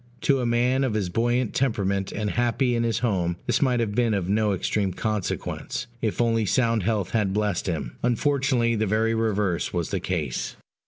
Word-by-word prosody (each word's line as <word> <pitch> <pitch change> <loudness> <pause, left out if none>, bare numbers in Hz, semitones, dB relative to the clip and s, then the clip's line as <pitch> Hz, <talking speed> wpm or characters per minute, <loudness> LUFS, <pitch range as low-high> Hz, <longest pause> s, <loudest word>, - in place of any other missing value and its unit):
To 135 -2 +3
a 125 - 0
man 125 +3 +2
of 125 -5 0
his 100 -4 -1
buoyant 120 +4 0
temperament, 100 -7 0
and 105 0 -2
happy 120 +1 +1
in 115 - +1
his 115 -1 0
home, 90 -7 0
this - - +1
might 125 -4 +2
have 110 -3 -1
been 115 -1 +2
of 95 -3 -1
no 105 +1 +2
extreme 95 0 0
consequence, 105 -1 -3 0.2
if 110 -3 -1
only 115 -2 +2
sound 115 +2 +2
health 100 -1 -1
had 105 -4 +1
blessed 105 -3 0
him: 80 -9 -3
unfortunately, 125 -1 +1
the 110 0 0
very 110 +3 +1
reverse 105 -5 0
was 85 -2 -2
the 95 - 0
case. 80 -8 -3
110 Hz, 190 wpm, -25 LUFS, 100-120 Hz, 0.2 s, To